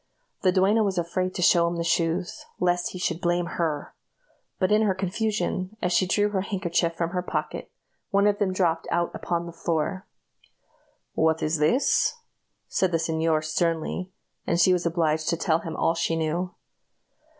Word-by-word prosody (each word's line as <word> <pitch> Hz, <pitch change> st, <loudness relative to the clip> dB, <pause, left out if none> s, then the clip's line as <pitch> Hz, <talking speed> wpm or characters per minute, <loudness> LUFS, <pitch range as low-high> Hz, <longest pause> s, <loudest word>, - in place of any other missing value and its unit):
The 185 Hz, -, +4 dB
duenna 195 Hz, +4 st, +3 dB
was 195 Hz, -3 st, -1 dB
afraid 185 Hz, +2 st, -1 dB
to 180 Hz, -, -1 dB
show 170 Hz, -2 st, +5 dB
him 170 Hz, -, -2 dB
the 170 Hz, -, -2 dB
shoes, 170 Hz, +2 st, -1 dB
lest 175 Hz, 0 st, +1 dB
he -, -, -6 dB
should 175 Hz, -1 st, -2 dB
blame 175 Hz, 0 st, +1 dB
her; 160 Hz, -4 st, -3 dB, 0.6 s
but 185 Hz, 0 st, +1 dB
in 210 Hz, +1 st, +5 dB
her 205 Hz, -4 st, +2 dB
confusion, 200 Hz, 0 st, -2 dB
as 180 Hz, -3 st, 0 dB
she 185 Hz, -, +3 dB
drew 205 Hz, +3 st, +2 dB
her 195 Hz, -2 st, -1 dB
handkerchief 175 Hz, -4 st, -1 dB
from 170 Hz, 0 st, -2 dB
her 180 Hz, -1 st, -1 dB
pocket, 180 Hz, -, -4 dB, 0.4 s
one 200 Hz, 0 st, +3 dB
of 205 Hz, 0 st, +2 dB
them 195 Hz, -2 st, +1 dB
dropped 170 Hz, -3 st, 0 dB
out 175 Hz, 0 st, 0 dB
upon 170 Hz, -1 st, -2 dB
the 170 Hz, -, -7 dB
floor. 170 Hz, +3 st, -2 dB, 1.1 s
"What 160 Hz, 0 st, +1 dB
is 155 Hz, 0 st, 0 dB
this?" 245 Hz, -, +2 dB, 0.5 s
said 185 Hz, -1 st, +1 dB
the 165 Hz, -, +2 dB
señor, 160 Hz, -1 st, 0 dB
sternly; 165 Hz, +3 st, -1 dB, 0.4 s
and 170 Hz, -, +1 dB
she 180 Hz, +2 st, +5 dB
was 175 Hz, -1 st, 0 dB
obliged 160 Hz, -2 st, 0 dB
to 170 Hz, -, +1 dB
tell 165 Hz, -1 st, +1 dB
him 165 Hz, -1 st, -6 dB
all 165 Hz, -, +2 dB
she 165 Hz, 0 st, 0 dB
knew. 165 Hz, +3 st, -2 dB
175 Hz, 175 wpm, -25 LUFS, 165-185 Hz, 1.1 s, show